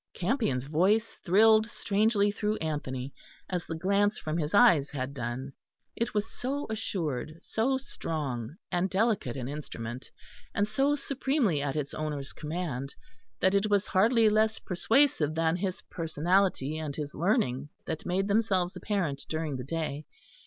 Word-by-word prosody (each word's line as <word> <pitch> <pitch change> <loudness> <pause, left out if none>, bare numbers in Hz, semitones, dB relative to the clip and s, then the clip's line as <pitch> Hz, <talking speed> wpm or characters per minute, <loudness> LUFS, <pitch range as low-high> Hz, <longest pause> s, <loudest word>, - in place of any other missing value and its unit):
Campion's 180 - 0
voice 190 +10 +2
thrilled 215 +4 +5
strangely 205 -1 +2
through 210 +1 -1
Anthony, 140 -4 -3 0.3
as 180 -2 -3
the 165 - -3
glance 200 +5 +2
from 155 0 -3
his 150 -1 -1
eyes 175 - +6
had 135 -1 -4
done. 130 +2 -4 0.4
It 230 -1 -2
was 210 +1 +1
so 280 +3 -2
assured, 160 - -3
so 260 +4 +1
strong 145 - -4 0.2
and 180 +2 +1
delicate 195 - +1
an 125 -2 -4
instrument, 130 -4 -6 0.5
and 205 - +2
so 275 +6 +2
supremely 270 - 0
at 140 0 -2
its 145 -2 -3
owner's 150 -3 -3
command, 150 -4 -4 0.5
that 190 - +4
it 200 +2 +2
was 205 -1 +3
hardly 225 +4 +4
less 215 +1 +3
persuasive 185 - +2
than 165 0 +2
his 185 0 -3
personality 165 -2 0
and 150 -3 -4
his 150 -1 -5
learning 150 - +1 0.2
that 160 -1 -4
made 190 +2 0
themselves 200 -4 +1
apparent 170 -10 -2
during 155 -3 -2
the 125 - -4
day. 150 0 -3
175 Hz, 145 wpm, -29 LUFS, 145-210 Hz, 0.5 s, eyes